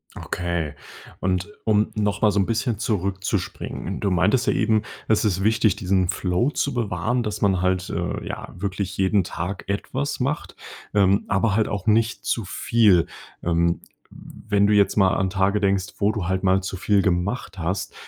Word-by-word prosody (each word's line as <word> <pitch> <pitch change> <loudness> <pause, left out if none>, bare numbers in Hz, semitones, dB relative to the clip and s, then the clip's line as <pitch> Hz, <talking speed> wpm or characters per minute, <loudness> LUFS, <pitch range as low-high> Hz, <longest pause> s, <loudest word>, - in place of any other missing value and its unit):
Okay 85 -4 -3 0.5
und 95 +1 -1 0.2
um 105 -1 +2
noch 105 -2 -1
mal 105 - +5
so 100 - +1
'n 95 - +1
bisschen 115 -1 -1
zurückzuspringen. 95 -2 -2
Du 100 - 0
meintest 95 +7 +2
ja - - +3
eben 110 -2 +2 0.3
das 110 - +3
ist 95 -3 0
wichtig 110 -1 +3
diesen 95 -2 +1
Flow 90 +10 +1
zu 140 -2 -1
bewahren 115 +1 -1
dass 105 -2 -4
man 95 -3 +2
halt, 90 0 0
äh, - - -3
ja - - -6
wirklich 100 +1 -3
jeden 95 +1 +3
Tag 90 +3 -5
etwas 130 +8 -2
macht, 135 +4 -2 0.4
ähm, 100 0 +3
aber 100 +1 +1
halt 110 0 +2
auch 100 -2 -4
nicht 115 +1 +1
zu 115 - 0
viel. 100 -3 +3 0.4
Ähm, 85 0 +1 0.3
w 110 - -14
wenn 100 0 +4
du 105 - +3
jetzt 100 -1 +4
mal 95 -2 +4
an 95 0 +1
Tage 100 +2 +1
denkst, 95 -2 0
wo 100 +1 +3
du 100 -6 -3
halt 95 +1 0
mal 95 0 +3
zu 95 0 -4
viel 100 +1 +2
gemacht 95 +3 -1
hast, 90 +3 -2
100 Hz, 180 wpm, -23 LUFS, 95-105 Hz, 0.5 s, mal